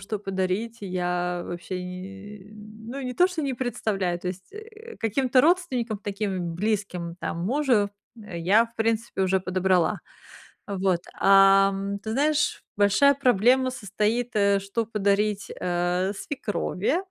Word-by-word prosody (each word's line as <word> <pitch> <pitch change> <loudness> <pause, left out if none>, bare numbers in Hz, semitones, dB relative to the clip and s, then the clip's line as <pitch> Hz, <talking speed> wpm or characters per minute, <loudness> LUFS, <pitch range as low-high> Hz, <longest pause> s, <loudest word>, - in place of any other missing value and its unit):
что 215 +1 -4
подарить, 195 +4 -2
я 180 -2 -2
вообще 175 +1 -5
ни, 195 +3 -9
э, - - -16
ну 220 +5 -9
не 250 -1 -4
то, 360 - +5
что 350 -4 -4
не 275 -2 -1
представляю 215 -8 -2
То 180 - -4
есть, 185 - -8
э, 440 +2 -11
каким-то 255 +3 +2
родственникам, 265 - +1
таким 195 -4 -3
близким, 185 -3 -2
там 170 +1 -3
мужу, 245 -3 +2 0.3
а 200 -5 -8
я 190 +7 +4
в 230 - -26
принципе 225 -2 -1
уже 190 0 +2
подобрала, 185 -1 +1 0.7
а 200 - -4
вот. 185 -2 +1 0.2
А, 195 0 +6
м, 200 +1 -3
ты 220 - -6
знаешь, 295 +3 +1
большая 205 +8 +4
проблема 255 0 +3
состоит, 220 +2 -1
э, 200 -1 +3
что 200 +4 -2
подарить, 205 -1 0
э, 180 +2 0
свекрови, 215 - -2
205 Hz, 145 wpm, -25 LUFS, 185-235 Hz, 0.7 s, А